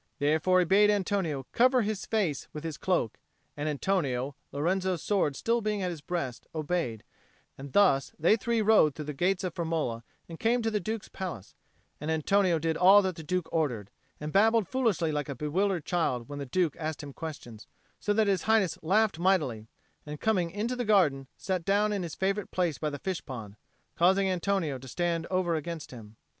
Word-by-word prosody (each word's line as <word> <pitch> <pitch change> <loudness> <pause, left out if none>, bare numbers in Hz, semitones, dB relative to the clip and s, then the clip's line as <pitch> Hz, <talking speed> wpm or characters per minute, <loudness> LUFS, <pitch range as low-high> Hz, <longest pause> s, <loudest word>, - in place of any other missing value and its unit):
Therefore 155 +5 +2
he 180 - +4
bade 200 +4 +5
Antonio 190 -9 0
cover 255 0 +4
his 215 -1 -3
face 195 -10 -1
with 150 - -6
his 160 -2 -4
cloak; 175 - 0 0.4
and 150 +1 -2
Antonio, 140 -5 -1 0.2
Lorenzo's 180 +4 -1
sword 195 -8 +1
being - - -14
still 230 - 0
at 200 -4 -1
his 165 -4 -7
breast, 140 -8 -4
obeyed; 155 -8 -2 0.5
and 135 0 -9
thus 160 -10 +4
they 170 +7 +4
three 230 +1 0
rode 205 -9 +5
through 155 - -6
the 150 - -4
gates 180 +6 0
of 180 -3 -3
Firmola 160 -9 -2 0.3
and 165 -1 -9
came 235 +1 +2
to 225 - 0
the 210 - 0
Duke's 220 +3 -4
palace; 175 - -7 0.5
and 150 - -4
Antonio 175 +3 +2
did 160 +1 -1
all 195 +3 +7
that 185 -2 -1
the 165 - -8
Duke 180 +2 -2
ordered, 125 -11 -1 0.3
and 150 0 -5
babbled 220 0 +4
foolishly 225 -11 +1
like 150 -1 -2
a 140 - -4
bewildered 170 +5 -1
child 130 -9 -1
when 145 0 -7
the 140 - -5
Duke 170 +1 0
asked 155 -1 -4
him 140 -1 -8
questions, 125 -9 -8 0.3
so 210 - -1
that 215 +1 +3
His 195 -3 0
Highness 215 -6 +3
laughed 200 +1 +2
mightily, 150 - +1 0.4
and, 150 0 -7
coming 185 -6 +1
into 215 +7 -2
the 245 - -2
garden, 165 - +3
sat 185 -2 -2
down 205 +3 +2
in 200 - -1
his 170 -3 -5
favourite 195 +1 -1
place 175 -5 -1
by 155 - -1
the 145 - -5
fish 185 +4 -4
pond, 110 -6 -8 0.4
causing 190 +3 +3
Antonio 180 -6 -1
to 130 - -11
stand 170 +2 -1
over 185 -2 0
against 160 0 -4
him. 110 -3 -11
175 Hz, 195 wpm, -29 LUFS, 150-195 Hz, 0.5 s, all